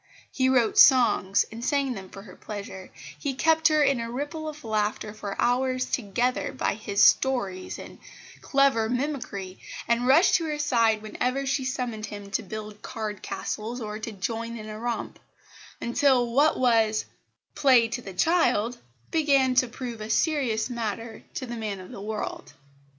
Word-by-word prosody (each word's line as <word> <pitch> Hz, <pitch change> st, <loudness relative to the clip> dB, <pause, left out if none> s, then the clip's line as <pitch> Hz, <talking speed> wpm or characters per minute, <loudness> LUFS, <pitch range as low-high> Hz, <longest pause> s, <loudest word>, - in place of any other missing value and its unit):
He 260 Hz, -1 st, +1 dB
wrote 245 Hz, -4 st, +3 dB
songs, 225 Hz, -7 st, +5 dB
and 230 Hz, +2 st, -8 dB
sang 275 Hz, -1 st, +1 dB
them 190 Hz, -4 st, -9 dB
for 195 Hz, -, -11 dB
her 185 Hz, -4 st, -13 dB
pleasure; 200 Hz, -3 st, -8 dB, 0.3 s
he 275 Hz, -2 st, -2 dB
kept 320 Hz, +3 st, +3 dB
her 305 Hz, -1 st, +4 dB
in 275 Hz, -3 st, +2 dB
a 230 Hz, 0 st, -4 dB
ripple 295 Hz, +5 st, -4 dB
of 300 Hz, -1 st, -10 dB
laughter 215 Hz, -1 st, -1 dB
for 205 Hz, -2 st, -6 dB
hours 255 Hz, +1 st, +1 dB
together 245 Hz, +2 st, -1 dB
by 260 Hz, -, 0 dB
his 200 Hz, -1 st, 0 dB
stories 200 Hz, -9 st, +2 dB
and -, -, -11 dB, 0.4 s
clever 270 Hz, -5 st, +2 dB
mimicry, 245 Hz, -8 st, -3 dB, 0.3 s
and 235 Hz, +1 st, +1 dB
rushed 305 Hz, +8 st, +5 dB
to 335 Hz, -, -4 dB
her 305 Hz, -1 st, -2 dB
side 230 Hz, -7 st, +2 dB
whenever 250 Hz, +5 st, -2 dB
she 270 Hz, 0 st, 0 dB
summoned 245 Hz, -5 st, -3 dB
him 200 Hz, -1 st, -9 dB
to -, -, 0 dB
build 215 Hz, +1 st, -8 dB
card 215 Hz, -2 st, -5 dB
castles 220 Hz, +5 st, -4 dB
or 215 Hz, -2 st, -5 dB
to 225 Hz, -, -5 dB
join 230 Hz, +3 st, -4 dB
in 215 Hz, -1 st, -8 dB
a 215 Hz, 0 st, -7 dB
romp 235 Hz, 0 st, -4 dB, 0.6 s
until 245 Hz, -1 st, +2 dB
what 290 Hz, +4 st, +4 dB
was 225 Hz, -4 st, +2 dB, 0.5 s
"play 255 Hz, -5 st, +5 dB
to 245 Hz, -, -4 dB
the 195 Hz, -5 st, -9 dB
child" 245 Hz, -, +2 dB, 0.3 s
began 275 Hz, -5 st, +3 dB
to 255 Hz, 0 st, +3 dB
prove 240 Hz, -2 st, -7 dB
a 215 Hz, -, -6 dB
serious 245 Hz, -5 st, +1 dB
matter 230 Hz, -2 st, -4 dB
to 260 Hz, -, -3 dB
the 240 Hz, -1 st, -6 dB
man 215 Hz, -4 st, -4 dB
of 185 Hz, -, -11 dB
the -, -, -8 dB
world. 215 Hz, +1 st, -5 dB
235 Hz, 165 wpm, -26 LUFS, 215-265 Hz, 0.6 s, songs